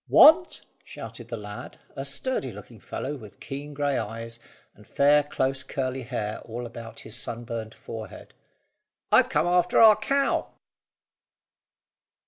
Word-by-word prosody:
"Want?" 340 +3 +7 0.2
shouted 115 +1 -9
the 115 -1 -5
lad, 105 -1 -8 0.2
a 135 - -4
sturdy 140 - -1
looking 105 +2 -12
fellow 145 +8 -4
with 110 -5 -13
keen 145 +1 -7
grey 145 -1 +1
eyes 115 +2 -6 0.3
and - - -19
fair 145 +1 +5
close 135 -2 -1
curly 130 -1 -3
hair 115 -4 -3
all 120 +2 -6
about 115 -1 -9
his 110 - -8
sunburned 115 -2 -5
forehead. 110 -1 -9 0.8
"I've - - +6
come - - +2
after 180 0 +3
our 220 -2 +9
cow!" 275 +6 0
130 Hz, 130 wpm, -26 LUFS, 115-145 Hz, 0.8 s, our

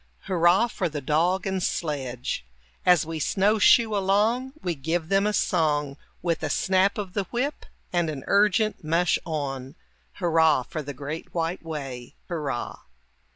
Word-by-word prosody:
Hurrah 175 +3 +3
for 190 -6 -2
the 150 -1 -4
dog 165 +7 +1
and 190 -1 -1
sledge! 130 - -2 0.4
As 180 -3 +5
we 160 0 -4
snow 200 +8 +2
shoe 220 +1 +5
along, 215 +7 +1
We 175 - 0
give 160 +3 -2
them 195 +1 +3
a - - +2
song, 150 -8 +1 0.3
With 170 -2 0
a - - -2
snap 190 +1 +2
of 195 -4 -5
the 200 -2 -1
whip 260 +8 -3 0.3
and 175 -2 +1
an 145 -4 -5
urgent 210 0 +2
"mush 165 +3 +2
on," 135 -3 -4 0.4
Hurrah 160 -6 +3
for 155 +5 -5
the 145 -1 -7
great 150 +6 -7
white 165 +2 -1
way! 135 -7 -7
Hurrah! 150 -8 -3
170 Hz, 155 wpm, -25 LUFS, 150-195 Hz, 0.4 s, As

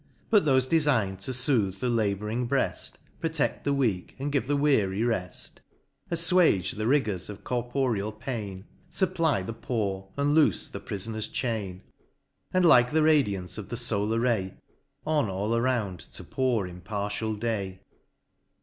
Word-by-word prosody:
But 210 -5 +5
thofe 130 -3 +3
defign'd 130 - +2
to - - -1
footh 120 -7 +3
the 125 - -1
labouring 110 +1 0
breaft, 135 0 -1 0.3
Proteft 160 -3 0
the 140 - +2
weak, 115 -10 0
and 140 +2 -3
give 140 -4 0
the 145 - +1
weary 110 -9 +2
reft; 100 -7 -3 0.5
AfTuage 170 - +3
the 110 +1 -2
rigors 110 -10 +1
of 105 - -9
corporeal 120 -4 -1
pain; 110 -4 -6 0.2
Supply 165 - +1
the 115 - -5
poor, 100 -5 -3
and 145 +1 +2
loofe 145 - +3
the - - -6
prifoner's 110 +2 -4
chain: 100 -7 -3 0.7
And 185 -1 +3
like 125 -7 +6
the 155 0 +3
radiance 105 - +2
of 105 - -8
the 120 - -3
folar 110 -2 0
ray, 110 -6 0 0.5
On 150 -7 +1
all 100 +4 -1
around 115 -7 0
to 85 +3 -10
pour 120 +1 0
impartial 100 +4 -3
day. 100 -4 -3
115 Hz, 145 wpm, -27 LUFS, 100-135 Hz, 0.7 s, like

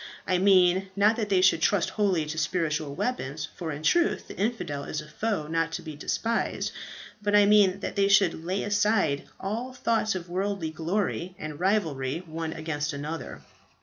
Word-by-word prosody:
I 185 -1 +1
mean, 190 0 +4
not 210 +2 +4
that 215 -3 -2
they 190 -2 +3
should 185 -3 +4
trust 200 -1 +2
wholly 190 -7 +1
to 155 +1 -5
spiritual 155 -3 -1
weapons 150 - -3
for 165 -2 -4
in 150 +1 -6
truth 345 - +2
the - - -8
infidel 195 -10 -2
is 155 - -4
a 150 - -8
foe 200 +1 -2
not 165 +1 -1
to 170 - -4
be 155 -2 -7
despised 230 +9 -1 0.5
but 205 0 +1
I 205 0 +7
mean, 200 -2 +4
that - - -4
they 200 -1 +3
should 195 -5 +3
lay 185 +3 -1
aside 205 -8 +1
all 230 +6 -4
thoughts 225 -4 0
of 180 -1 -5
worldly 190 -2 -2
glory, 180 +2 -2
and 155 -1 -7
rivalry 165 -6 0
one 160 0 -4
against 155 -1 -3
another." 150 +2 -6
180 Hz, 180 wpm, -27 LUFS, 155-205 Hz, 0.5 s, I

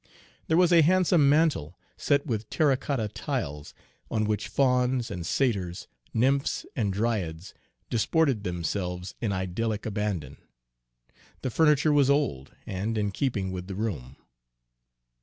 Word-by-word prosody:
There 160 - +3
was 180 -1 +4
a 170 - +7
handsome 175 -3 +4
mantel, 150 - +2 0.2
set 140 -1 +1
with 110 -6 -3
terra 150 -4 +3
cotta 130 -4 -2
tiles, 75 -7 -4 0.3
on 110 - 0
which 105 -1 -1
fauns 125 0 +1
and 90 -3 -4
satyrs, 95 -10 -1 0.2
nymphs 135 +4 +1
and 105 -6 0
dryads, 95 -5 -2 0.3
disported 130 0 +1
themselves 90 +1 -3
in 110 -4 0
idyllic 100 +4 -2
abandon. 100 -10 -3 1.1
The 130 - -1
furniture 150 +1 +4
was 140 -2 +4
old, 140 - 0
and 105 +4 -3
in 105 -1 0
keeping 100 -5 -1
with 90 -1 -6
the 95 - -5
room. 90 - -4
110 Hz, 130 wpm, -27 LUFS, 95-140 Hz, 1.1 s, a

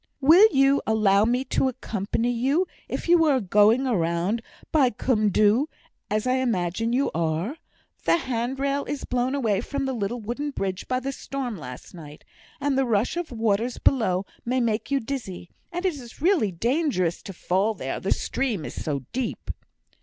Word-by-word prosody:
"Will 330 +10 +8
you 275 0 +4
allow 210 -2 +4
me 245 +3 +1
to 270 - +1
accompany 230 -1 -2
you 270 +9 +1 0.2
if - - -4
you 340 -1 +5
are 280 -4 +3
going 210 +4 +4
the 255 -4 +1
round 170 +6 0 0.3
by 280 -5 +4
Cwm 215 -2 +1
Dhu, 215 - +3 0.4
as 215 +2 0
I 255 +1 +2
imagine 225 -3 0
you 265 +3 +1
are? 165 - -1 0.5
The - - +4
hand 255 -3 -2
rail 280 +1 0
is 290 - -4
blown 250 +2 0
away 220 -7 +1
from 275 +2 -3
the 265 - -1
little 235 +1 -2
wooden 240 +7 -3
bridge 195 -8 -4
by 255 0 0
the 270 +2 -3
storm 270 -3 -5
last 125 -7 -9
night, 150 -3 -11 0.4
and 280 -1 0
the 270 - +2
rush 225 +2 +1
of 345 -4 -4
waters 225 +1 0
below 195 -7 +2 0.2
may 255 +2 0
make 225 -2 -1
you 280 -1 +2
dizzy; 225 -9 -6 0.2
and 355 +2 -4
it 370 - +2
is 245 -5 -11
really 320 - +2
dangerous 225 - 0
to - - -8
fall 195 +4 0
there, - - -4
the - - -3
stream 225 - -1
is - - -6
so 140 -3 -2
deep." 255 -1 -3
240 Hz, 180 wpm, -25 LUFS, 200-270 Hz, 0.5 s, Will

